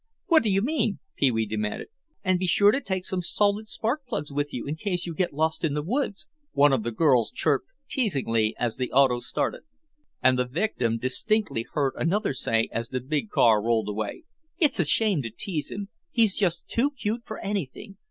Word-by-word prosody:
"What 330 -4 +5
do 220 - 0
you 195 0 +2
mean?" 260 -6 0 0.2
Pee 140 - +3
wee 110 -2 0
demanded. 105 0 -3 0.3
"And 185 -2 +2
be 185 - -1
sure 205 +4 +5
to 275 - 0
take 190 -5 -3
some 185 -1 -1
salted 205 +4 +1
spark 245 +8 -2
plugs 150 -10 -3
with 145 +1 -1
you 120 - -5
in 145 - -3
case 180 0 -2
you 170 - -4
get 175 +3 0
lost 160 +4 -1
in 150 -3 +1
the 150 - -1
woods," 220 - -2 0.3
one 145 0 +5
of 130 - +2
the 115 - -2
girls 125 -2 +3
chirped 135 -2 0 0.2
teasingly 130 - 0
as 120 -2 -1
the 125 -1 -2
auto 130 -2 +4
started. - - -2 0.6
And 130 0 +5
the 125 - +2
victim 125 - -1
distinctly 130 - 0
heard 140 -3 +1
another 195 +1 +1
say, 115 -3 +1
as 115 0 -3
the 130 - -2
big 130 -3 -2
car 110 0 +4
rolled 110 -1 +1
away: 105 - -4 0.3
"It's 305 - +2
a 175 - +3
shame 200 0 +2
to 115 - -4
tease 150 - -3
him; 200 0 -6 0.2
he's 230 - +3
just 175 -4 0
too 255 +5 +1
cute 235 -5 -3
for 220 - -7
anything. 195 - -4
160 Hz, 200 wpm, -26 LUFS, 125-205 Hz, 0.6 s, What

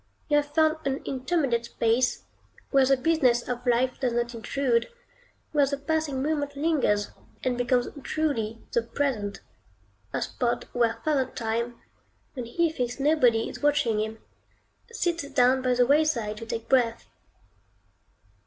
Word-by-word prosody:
You 295 - +4
have 290 0 +1
found 315 0 +4
an 270 0 -2
intermediate 260 -3 0
space, 235 +2 +1 0.5
where 270 -2 +5
the 270 0 +4
business 255 -5 +2
of 245 0 -4
life 250 +1 +2
does 250 -3 0
not 240 0 -1
intrude; 235 +1 0 0.6
where 290 -2 +3
the 280 +1 -2
passing 285 -2 -1
moment 290 -1 -1
lingers, 280 -9 +1 0.3
and 255 -1 +1
becomes 245 0 +1
truly 230 -8 -2
the 235 - +2
present; 230 -5 -2 0.7
a - - -1
spot 240 -2 -1
where 230 -2 +1
Father 285 -5 +2
Time, 235 0 -3 0.5
when 250 -3 -5
he 330 +8 0
thinks 250 -4 -3
nobody 255 -6 +3
is - - -8
watching 290 -7 +2
him, 220 +1 -3 0.7
sits 340 -9 -1
down 260 -1 +3
by 255 -1 +1
the 245 0 +4
wayside 270 -7 +2
to 230 - -8
take 230 0 -4
breath. 240 -3 +2
255 Hz, 145 wpm, -26 LUFS, 235-290 Hz, 0.7 s, where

